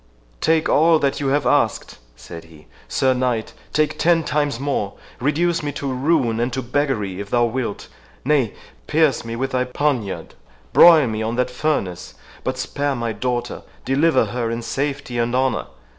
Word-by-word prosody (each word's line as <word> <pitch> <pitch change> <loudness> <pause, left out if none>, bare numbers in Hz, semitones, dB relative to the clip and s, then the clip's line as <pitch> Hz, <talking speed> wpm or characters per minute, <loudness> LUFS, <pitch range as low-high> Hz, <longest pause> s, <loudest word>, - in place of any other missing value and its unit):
"Take 160 -1 +2
all 160 +2 +5
that 140 -2 0
you 140 - -1
have 145 +2 +1
asked," - - +1 0.2
said 85 +7 -10
he, 80 -2 -17 0.2
"Sir 130 -1 +2
Knight—take 125 +4 -2
ten 165 -1 +3
times 145 -5 -1
more—reduce 145 +6 -1
me 145 -1 -3
to 135 -1 -3
ruin 130 -4 +1
and 120 +2 0
to 130 +1 -2
beggary, 120 -8 -1
if 100 0 -6
thou 120 -1 +3
wilt,—nay, 125 +2 -3 0.3
pierce 155 -3 +2
me 115 0 -5
with 135 +3 -2
thy 125 0 +1
poniard, 125 -5 -2 0.4
broil 165 -4 +8
me 110 -2 -3
on 110 +2 -2
that 125 0 0
furnace, 125 - -2 0.3
but - - -2
spare 145 -1 -2
my 115 -2 -2
daughter, 120 +2 -3 0.2
deliver 140 +1 +3
her 115 +2 -3
in 115 +1 -3
safety 135 +1 -3
and 120 +1 0
honour! 130 0 0
130 Hz, 160 wpm, -21 LUFS, 115-145 Hz, 0.4 s, broil